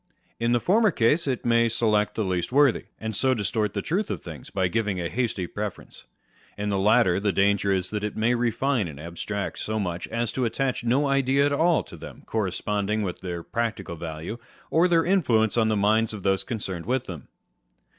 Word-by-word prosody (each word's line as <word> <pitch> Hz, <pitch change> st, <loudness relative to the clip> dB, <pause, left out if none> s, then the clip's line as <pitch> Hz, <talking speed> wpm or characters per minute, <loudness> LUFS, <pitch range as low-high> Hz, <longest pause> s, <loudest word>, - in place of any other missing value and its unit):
In 115 Hz, +1 st, +1 dB
the 120 Hz, -, +3 dB
former 210 Hz, -, +3 dB
case, 150 Hz, +1 st, +2 dB
it 130 Hz, -3 st, -2 dB
may 115 Hz, 0 st, +3 dB
select 105 Hz, -2 st, +1 dB
the 110 Hz, -, -1 dB
least 90 Hz, 0 st, -1 dB
worthy, 140 Hz, -2 st, +3 dB
and 110 Hz, -1 st, -4 dB
so 130 Hz, +5 st, +2 dB
distort 105 Hz, -1 st, -1 dB
the -, -, -2 dB
truth 190 Hz, +6 st, -1 dB
of 90 Hz, -, -4 dB
things, -, -, -9 dB
by 95 Hz, -2 st, 0 dB
giving 105 Hz, -1 st, -1 dB
a 85 Hz, -, -1 dB
hasty 115 Hz, -7 st, -1 dB
preference: 105 Hz, +2 st, -7 dB, 0.5 s
in 105 Hz, 0 st, -2 dB
the 100 Hz, -1 st, 0 dB
latter, 105 Hz, -2 st, +4 dB
the 100 Hz, 0 st, +1 dB
danger 100 Hz, 0 st, +2 dB
is 95 Hz, -2 st, 0 dB
that 105 Hz, -1 st, -3 dB
it 105 Hz, -, -3 dB
may 115 Hz, +3 st, +2 dB
refine 120 Hz, -1 st, 0 dB
and 75 Hz, -3 st, -9 dB
abstract 85 Hz, +5 st, -4 dB
so 110 Hz, 0 st, -2 dB
much 90 Hz, -3 st, -3 dB
as 115 Hz, 0 st, -2 dB
to 130 Hz, -, -2 dB
attach 125 Hz, +2 st, -1 dB
no 130 Hz, +5 st, +2 dB
idea 140 Hz, 0 st, +3 dB
at 145 Hz, -, +1 dB
all 165 Hz, +3 st, +3 dB
to -, -, -12 dB
them -, -, -11 dB
corresponding 105 Hz, 0 st, -1 dB
with 90 Hz, -3 st, -4 dB
their 85 Hz, -2 st, -5 dB
practical 110 Hz, -7 st, -3 dB
value, 80 Hz, +7 st, -6 dB, 0.3 s
or 165 Hz, +3 st, +4 dB
their 165 Hz, -2 st, +3 dB
influence 125 Hz, -, +2 dB
on 115 Hz, -2 st, +3 dB
the 110 Hz, -1 st, +1 dB
minds 110 Hz, +2 st, +2 dB
of 100 Hz, -, -9 dB
those 95 Hz, -1 st, +2 dB
concerned 95 Hz, -7 st, -5 dB
with 130 Hz, 0 st, 0 dB
them. 80 Hz, -7 st, -8 dB
110 Hz, 205 wpm, -25 LUFS, 100-125 Hz, 0.5 s, latter